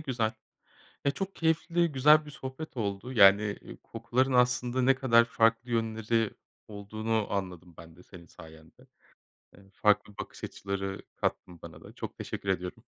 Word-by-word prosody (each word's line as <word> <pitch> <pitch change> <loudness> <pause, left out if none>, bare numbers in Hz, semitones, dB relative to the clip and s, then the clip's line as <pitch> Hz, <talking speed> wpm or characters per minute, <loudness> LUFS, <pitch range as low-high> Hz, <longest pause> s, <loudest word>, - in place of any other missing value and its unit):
güzel. 120 -7 -1 0.7
Ya, 140 - +3
çok 195 +7 -5
keyifli, 165 0 +1
güzel 150 +3 +5
bir 150 - -9
sohbet 135 +2 -8
oldu. 105 +3 -3
Yani, 100 -1 +5
iii, - - -11
kokuların 120 +3 -1
aslında 125 0 +2
ne 135 +1 +5
kadar 115 -3 +4
farklı 115 +1 +1
yönleri 110 -1 0 0.4
olduğunu 110 +1 -3
anladım 90 -3 -4
ben 85 0 -13
de 90 - -16
senin 90 -3 -14
sayende. 80 -2 -16 0.7
Eee, 95 -1 -19
farklı 105 0 +2
bakış - - -8
açıları 95 0 -4
kattın 85 -2 -3
bana - - -11
da. - - -13
Çok - - -7
teşekkür 100 - -5
ediyorum. 90 -1 -3
115 Hz, 150 wpm, -29 LUFS, 100-130 Hz, 0.7 s, güzel